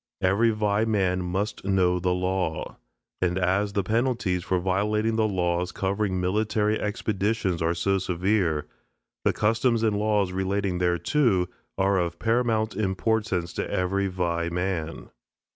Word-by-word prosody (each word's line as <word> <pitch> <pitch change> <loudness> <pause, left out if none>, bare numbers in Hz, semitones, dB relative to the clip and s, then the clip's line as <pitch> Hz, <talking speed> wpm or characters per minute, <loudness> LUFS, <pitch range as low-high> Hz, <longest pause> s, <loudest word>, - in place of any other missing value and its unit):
Every 100 +5 +3
Vai 105 -1 +1
man 95 -5 +1
must 95 +4 -3
know 90 -2 +2
the 90 +1 0
law. 90 -2 -2 0.4
And 90 0 +1
as 95 +3 +1
the 100 - 0
penalties 110 -4 0
for 95 - 0
violating 105 +4 0
the 110 -1 +2
laws 90 -2 0
covering 95 -1 -1
military 105 +3 +1
expeditions 105 -3 -1
are 85 +1 +1
so 95 +3 +1
severe, 90 -3 0 0.6
the - - +5
customs 115 +2 +1
and 110 -2 +2
laws 105 -2 +1
relating 95 0 -1
thereto 90 - +2 0.3
are 95 0 +2
of 85 -1 -2
paramount 115 -1 +1
importance 95 -3 -1
to - - -3
every 95 +2 0
Vai 85 -2 -1
man. 85 -3 -3
95 Hz, 135 wpm, -26 LUFS, 90-105 Hz, 0.6 s, the